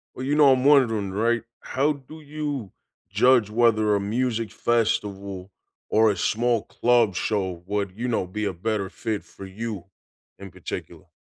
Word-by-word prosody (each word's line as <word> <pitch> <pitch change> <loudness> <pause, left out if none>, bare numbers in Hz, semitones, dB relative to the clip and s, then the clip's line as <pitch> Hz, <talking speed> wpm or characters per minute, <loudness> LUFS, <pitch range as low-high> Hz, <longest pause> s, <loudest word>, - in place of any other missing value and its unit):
Well, 130 - -5
you 145 +2 +1
know, 145 -3 +7
I'm 130 0 +1
wondering, 120 -9 +4
right? 115 +4 +1 0.2
How 140 +3 0
do 145 +3 -13
you 145 -7 -5 0.4
judge 115 +1 +4
whether 110 -2 +3
a - - 0
music 115 +2 -1
festival 100 -4 -1 0.4
or 110 0 +4
a - - -6
small 115 +4 +1
club 120 -6 +2
show 95 -5 -2
would, 100 -1 -2
you 120 +3 -3
know, 115 -6 0
be 105 +4 -4
a 100 - -1
better 100 +2 -2
fit 110 +1 -4
for 100 - -12
you, 100 -1 -6 0.5
in 100 -3 -10
particular? - - -8
110 Hz, 160 wpm, -24 LUFS, 100-125 Hz, 0.5 s, know